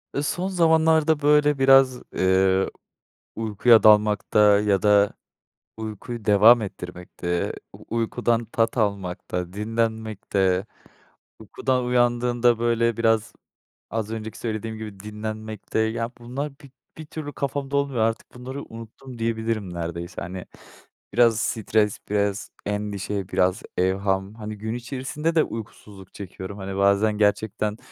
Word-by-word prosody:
Eee, 140 Hz, -, 0 dB
son 175 Hz, +5 st, -1 dB
zamanlarda, 160 Hz, -3 st, +3 dB
böyle, 150 Hz, -1 st, +4 dB
biraz, 135 Hz, -1 st, +5 dB
eee, 95 Hz, 0 st, +3 dB, 0.7 s
uykuya 110 Hz, +1 st, +4 dB
dalmakta 105 Hz, -1 st, +5 dB
ya 100 Hz, -2 st, +1 dB
da 105 Hz, -1 st, +4 dB, 0.6 s
uykuyu 110 Hz, +1 st, -6 dB
devam 110 Hz, +3 st, +6 dB
ettirmekte, 90 Hz, -2 st, -4 dB, 0.2 s
u -, -, -14 dB
uykudan 115 Hz, 0 st, 0 dB
tat 115 Hz, +1 st, 0 dB
almakta, 90 Hz, -4 st, -2 dB
dinlenmekte, 105 Hz, -3 st, -1 dB, 0.7 s
uykudan 125 Hz, +4 st, -1 dB
uyandığında, 120 Hz, -1 st, +2 dB
böyle, 115 Hz, -1 st, +1 dB
biraz, 115 Hz, -1 st, +1 dB, 0.6 s
az 110 Hz, -1 st, -3 dB
önceki 110 Hz, -1 st, -6 dB
söylediğim 110 Hz, -1 st, -4 dB
gibi 105 Hz, -3 st, -8 dB
dinlenmekte 110 Hz, +1 st, -5 dB
ya, 115 Hz, +1 st, -1 dB
bunlar 130 Hz, +5 st, -4 dB
bir 140 Hz, -, -14 dB, 0.3 s
bir 160 Hz, -, -8 dB
türlü 150 Hz, -1 st, -7 dB
kafamda 140 Hz, 0 st, -2 dB
olmuyor 140 Hz, -3 st, -1 dB
artık 115 Hz, +1 st, -1 dB
bunları 130 Hz, +3 st, -7 dB
unuttum 115 Hz, +3 st, -11 dB
diyebilirim 110 Hz, -4 st, -2 dB
neredeyse, 85 Hz, +1 st, -5 dB
hani. 90 Hz, +1 st, -6 dB, 0.7 s
Biraz 115 Hz, -2 st, +4 dB
stres, 105 Hz, -1 st, 0 dB
biraz 100 Hz, 0 st, -1 dB, 0.2 s
endişe, 105 Hz, -1 st, -3 dB
biraz 90 Hz, +3 st, +1 dB
evham... 95 Hz, +2 st, 0 dB
Hani, 110 Hz, -1 st, -7 dB
gün 110 Hz, +2 st, -4 dB
içerisinde 135 Hz, +6 st, -3 dB
de 160 Hz, -, +5 dB
uykusuzluk 100 Hz, -3 st, -9 dB
çekiyorum. 100 Hz, 0 st, -8 dB
Hani, 95 Hz, 0 st, -5 dB
bazen 100 Hz, +2 st, +3 dB
gerçekten 105 Hz, 0 st, 0 dB
110 Hz, 120 wpm, -24 LUFS, 100-120 Hz, 0.7 s, devam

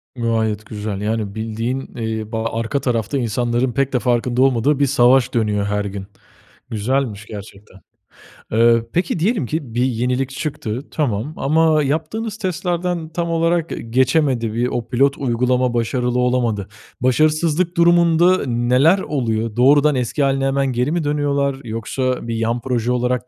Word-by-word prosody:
Gayet 110 Hz, -3 st, -1 dB
güzel. 105 Hz, -2 st, -5 dB
Yani, 105 Hz, -1 st, -2 dB
bildiğin, 115 Hz, +4 st, -4 dB
eee, 110 Hz, -1 st, -4 dB
ba 110 Hz, -1 st, -2 dB
arka 115 Hz, +5 st, -2 dB
tarafta 125 Hz, +1 st, -1 dB
insanların 120 Hz, +1 st, 0 dB
pek 140 Hz, +2 st, -1 dB
de 125 Hz, -, +2 dB
farkında 120 Hz, 0 st, 0 dB
olmadığı, 135 Hz, +2 st, +2 dB
bir 140 Hz, -, +4 dB
savaş 130 Hz, -1 st, +3 dB
dönüyor 105 Hz, -4 st, 0 dB
her 105 Hz, 0 st, -1 dB
gün. 100 Hz, -1 st, -6 dB, 0.6 s
Güzelmiş 110 Hz, -1 st, -2 dB
gerçekten. 100 Hz, -2 st, -11 dB, 0.7 s
Eee, 115 Hz, +1 st, +4 dB
peki, 175 Hz, -1 st, 0 dB
diyelim 200 Hz, -, +1 dB
ki 140 Hz, -4 st, -4 dB
bir 120 Hz, -, +1 dB
yenilik 125 Hz, +2 st, -1 dB
çıktı, 135 Hz, -4 st, -4 dB
tamam. 135 Hz, -1 st, -2 dB
Ama 155 Hz, +2 st, +3 dB
yaptığınız 165 Hz, +10 st, -2 dB
testlerden 180 Hz, -3 st, -2 dB
tam 170 Hz, +1 st, -3 dB
olarak 165 Hz, 0 st, +1 dB
ge -, -, -4 dB
geçemedi. 130 Hz, -1 st, +1 dB
Bi 120 Hz, +2 st, 0 dB
o 120 Hz, -2 st, -3 dB
pilot 140 Hz, +3 st, +2 dB
uygulama 125 Hz, -1 st, +1 dB
başarılı 125 Hz, +1 st, 0 dB
olamadı. 120 Hz, -5 st, 0 dB, 0.3 s
Başarısızlık 155 Hz, +6 st, +1 dB
durumunda, 170 Hz, +1 st, +4 dB
neler 125 Hz, +9 st, +3 dB
oluyor? 115 Hz, -, -2 dB
Doğrudan 145 Hz, +4 st, +4 dB
eski 130 Hz, +3 st, -1 dB
hâline 135 Hz, 0 st, +1 dB
hemen 135 Hz, 0 st, +1 dB
geri 125 Hz, +4 st, 0 dB
mi 170 Hz, 0 st, 0 dB
dönüyorlar 140 Hz, -2 st, 0 dB
yoksa 120 Hz, +2 st, -3 dB
bir 115 Hz, -, -2 dB
yan 115 Hz, +1 st, -1 dB
proje 125 Hz, -2 st, -1 dB
olarak 125 Hz, 0 st, -1 dB
125 Hz, 145 wpm, -19 LUFS, 115-145 Hz, 0.7 s, bir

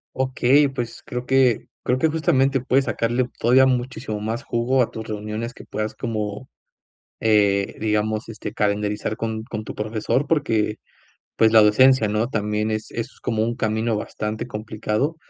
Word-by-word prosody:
Okey, 130 Hz, +2 st, +3 dB
pues, 120 Hz, -4 st, -5 dB
creo 125 Hz, 0 st, -5 dB
que 130 Hz, -3 st, +3 dB, 0.2 s
creo 125 Hz, -, +1 dB
que 160 Hz, +5 st, +2 dB
justamente 135 Hz, -4 st, +2 dB
puedes 130 Hz, +2 st, +2 dB
sacarle 120 Hz, +2 st, 0 dB
todavía 130 Hz, +3 st, +5 dB
muchísimo 125 Hz, -4 st, -2 dB
más 110 Hz, +3 st, -3 dB
jugo 125 Hz, +3 st, +1 dB
a -, -, -4 dB
tus 110 Hz, -1 st, -7 dB
reuniones 110 Hz, +2 st, -4 dB
que -, -, -12 dB
puedas 110 Hz, 0 st, -4 dB
como, 110 Hz, +2 st, -4 dB, 0.7 s
eh, 100 Hz, -3 st, +2 dB
digamos, 110 Hz, +1 st, 0 dB
este, 110 Hz, -2 st, -6 dB
calendarizar 105 Hz, +1 st, -1 dB
con 110 Hz, -1 st, -3 dB
con 110 Hz, -2 st, -6 dB
tu -, -, -7 dB
profesor 110 Hz, +6 st, -1 dB
porque, 115 Hz, -9 st, +1 dB, 0.6 s
pues, 110 Hz, -, +5 dB
la 110 Hz, -1 st, +8 dB
docencia, 115 Hz, +2 st, +5 dB
¿no?, 105 Hz, +2 st, 0 dB
también 105 Hz, -1 st, -1 dB
es 110 Hz, 0 st, -3 dB
es 115 Hz, +3 st, -6 dB
como 110 Hz, -2 st, -1 dB
un 115 Hz, +1 st, -1 dB
camino 110 Hz, +1 st, 0 dB
bastante 105 Hz, +1 st, -4 dB
complicado 110 Hz, +5 st, -2 dB
110 Hz, 155 wpm, -22 LUFS, 105-125 Hz, 0.7 s, la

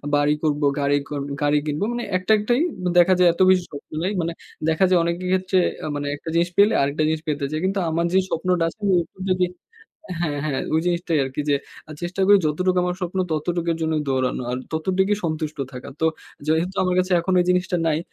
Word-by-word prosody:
বাড়ি 145 Hz, +1 st, +3 dB
করবো, 150 Hz, -1 st, +1 dB
গাড়ি 145 Hz, 0 st, +2 dB
করবো 140 Hz, -1 st, -4 dB
গাড়ি 145 Hz, 0 st, +3 dB
কিনবো। 150 Hz, +5 st, -2 dB
মানে 240 Hz, 0 st, -3 dB
একটা-একটাই। 215 Hz, +7 st, +2 dB, 0.2 s
দ -, -, -3 dB
দেখা 180 Hz, +2 st, +6 dB
যায় 180 Hz, -, +6 dB
এত 180 Hz, -, -4 dB
বেশি 185 Hz, -1 st, +4 dB
স্বপ্ন 145 Hz, -, -10 dB
নাই। 190 Hz, -, 0 dB
মানে 165 Hz, +1 st, -2 dB, 0.4 s
দেখা 160 Hz, +4 st, +2 dB
যায় 180 Hz, -2 st, +4 dB
অনেকের 170 Hz, +2 st, -2 dB
ক্ষেত্রে 185 Hz, 0 st, +1 dB, 0.3 s
আ -, -, -3 dB
মানে 145 Hz, 0 st, -3 dB
একটা 160 Hz, +3 st, -8 dB
জিনিস 170 Hz, +1 st, +2 dB
পেলে 205 Hz, +2 st, +6 dB
আরেকটা 145 Hz, +3 st, 0 dB
জিনিস 160 Hz, -1 st, -1 dB
পেতে 145 Hz, -2 st, -1 dB
চায়। 155 Hz, +1 st, -2 dB
কিন্তু 195 Hz, +1 st, 0 dB
আমার 170 Hz, +1 st, 0 dB
যেই 190 Hz, 0 st, +4 dB
স্বপ্নটা 180 Hz, 0 st, 0 dB
আছে 210 Hz, -, -17 dB, 0.2 s
এরকম 175 Hz, +2 st, -4 dB
যদি 180 Hz, 0 st, +2 dB, 0.8 s
হ্যাঁ, 150 Hz, -4 st, -1 dB
হ্যাঁ। 140 Hz, -3 st, -1 dB
ওই 160 Hz, -, +3 dB
জিনিসটাই 170 Hz, -2 st, 0 dB
আরকি 135 Hz, +2 st, -4 dB
যে -, -, +4 dB, 0.3 s
আ -, -, -11 dB
চেষ্টা 180 Hz, +2 st, -3 dB
করি 205 Hz, 0 st, +7 dB
যতটুকু 180 Hz, +4 st, +1 dB
আমার 180 Hz, 0 st, -1 dB
স্বপ্ন 180 Hz, +1 st, -3 dB
ততটুকের 170 Hz, +1 st, -1 dB
জন্য 160 Hz, 0 st, 0 dB
দৌড়ানো। 130 Hz, -1 st, 0 dB
আর 125 Hz, -, -1 dB, 0.2 s
ততটুকই 190 Hz, +5 st, +1 dB
সন্তুষ্ট 155 Hz, -2 st, -3 dB
থাকা। 125 Hz, -, -8 dB
তো -, -, +1 dB, 0.4 s
যেহেতু 165 Hz, +4 st, +1 dB
আমার 180 Hz, -1 st, +1 dB
কাছে 185 Hz, 0 st, +1 dB
এখন 185 Hz, +2 st, -2 dB
এই -, -, +2 dB
জিনিসটা 180 Hz, 0 st, +1 dB
নাই, 155 Hz, -1 st, +2 dB
170 Hz, 210 wpm, -22 LUFS, 150-185 Hz, 0.8 s, করি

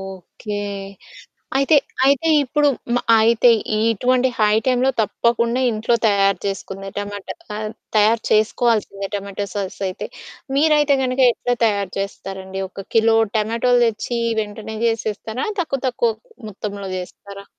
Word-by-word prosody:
Okay. 205 Hz, +3 st, -8 dB, 1.0 s
అయితే, 275 Hz, +3 st, +4 dB, 0.3 s
అయితే 280 Hz, +4 st, +3 dB, 0.2 s
ఇప్పుడు 290 Hz, +3 st, +2 dB, 0.3 s
మ -, -, +3 dB, 0.2 s
అయితే 230 Hz, +2 st, +4 dB, 0.3 s
ఇటువంటి 245 Hz, +4 st, +2 dB
హై 210 Hz, -1 st, +4 dB
టైమ్‌లొ 255 Hz, +1 st, +3 dB
తప్పకుండా 235 Hz, +3 st, +1 dB
ఇంట్లో 220 Hz, +1 st, 0 dB
తయారు 195 Hz, -2 st, +3 dB
చేసుకుంది 195 Hz, 0 st, -5 dB
టమాటా. 205 Hz, -1 st, -6 dB, 0.2 s
కా 210 Hz, -, -4 dB, 0.4 s
తయారు 220 Hz, +2 st, +4 dB
చేసుకోవాల్సిందే 215 Hz, -2 st, +1 dB
టమాటో 200 Hz, 0 st, -4 dB
సాస్ 200 Hz, -2 st, -4 dB
అయితే. 185 Hz, -, -5 dB, 0.5 s
మీరైతే 295 Hz, -1 st, +4 dB
కనుక 255 Hz, +1 st, -1 dB
ఎట్లా 245 Hz, +1 st, -2 dB
తయారు 200 Hz, -4 st, 0 dB
చేస్తారండి? 195 Hz, -1 st, -5 dB
ఒక 195 Hz, +1 st, -10 dB
కిలో 225 Hz, 0 st, +4 dB, 0.2 s
టమాటోలు 230 Hz, +3 st, +2 dB
తెచ్చి 230 Hz, +2 st, -2 dB, 0.2 s
వెంటనే 215 Hz, +1 st, -6 dB
చేసేస్తారా? 220 Hz, +1 st, -2 dB
తక్కువ 275 Hz, -6 st, -2 dB
తక్కువ 460 Hz, -, +1 dB, 0.4 s
మొత్తంలో 200 Hz, -1 st, -6 dB
చేస్తారా? 200 Hz, +2 st, -10 dB
220 Hz, 120 wpm, -20 LUFS, 200-245 Hz, 1.0 s, అయితే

